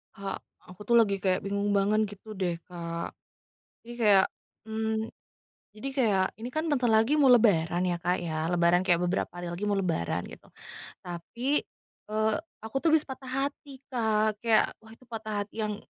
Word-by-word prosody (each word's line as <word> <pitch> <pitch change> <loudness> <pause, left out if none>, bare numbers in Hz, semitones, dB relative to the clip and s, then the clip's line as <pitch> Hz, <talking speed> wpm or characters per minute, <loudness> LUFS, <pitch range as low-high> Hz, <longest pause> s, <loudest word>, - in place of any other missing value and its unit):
Kak, 195 0 -5 0.2
aku 180 +2 -13
tuh 235 - +4
lagi 210 -4 +4
kayak 185 0 +1
bingung 200 +1 -1
banget 205 +2 +3
gitu 205 +2 -10
deh, 180 -4 -1
Kak. 170 -1 -5 0.7
Jadi 240 - -9
kayak, 200 -4 +6 0.4
mmm 220 0 -1 0.7
jadi 260 +6 -4
kayak, 215 -8 +2
ini 230 - -5
kan 310 - +1
bentar 255 -4 +2
lagi 225 +7 +4
mau 280 - +6
lebaran 180 -8 +4
ya, 175 -2 0
Kak, 180 +1 +1
ya. 160 -1 -2
Lebaran 175 0 +3
kayak 180 -2 +2
beberapa 180 +2 0
hari 175 -1 -5
lagi 195 +4 -3
mau 205 - +2
lebaran, 160 - -1
gitu. - - -12 0.5
Tapi, 235 - -2 0.5
eee, 215 0 +2 0.2
aku 220 0 -10
tuh 330 - +4
habis 310 -1 +4
patah 265 -1 -8 0.2
hati, 280 -1 -9
Kak. 220 -4 +1
Kayak, 225 -2 +3
wah 220 - -15
itu 230 +3 -16
patah 215 -3 -4
hati 220 +2 -5
yang 210 -1 -2
210 Hz, 175 wpm, -28 LUFS, 180-225 Hz, 0.7 s, kayak